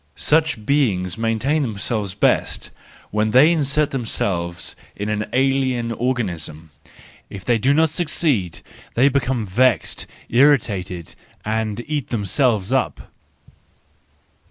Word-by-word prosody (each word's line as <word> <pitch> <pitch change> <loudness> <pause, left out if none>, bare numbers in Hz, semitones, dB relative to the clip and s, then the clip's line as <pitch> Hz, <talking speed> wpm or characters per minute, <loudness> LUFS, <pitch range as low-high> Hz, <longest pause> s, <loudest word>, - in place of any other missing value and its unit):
Such 150 -8 +1
beings 100 -11 +1
maintain 115 +7 0
themselves 105 -4 -2
best - - 0 0.4
when 105 +1 +1
they 130 +8 +6
insert 150 -2 +1
them¬ 125 -4 -3
selves 85 -5 -2 0.2
in 105 +1 -4
an 105 0 -2
alien 130 -2 +1
organism; 90 - -3 0.6
if 95 -2 -9
they 120 -2 +2
do 130 +6 +2
not 160 +1 +3
succeed 140 - 0 0.3
they 130 +4 +5
become 130 -4 0
vexed, 125 +6 +1 0.2
irritated, 105 - +1 0.3
and 110 +1 -2
eat 145 -3 -3
themselves 110 -1 0
up. - - -1
115 Hz, 110 wpm, -21 LUFS, 100-135 Hz, 0.6 s, they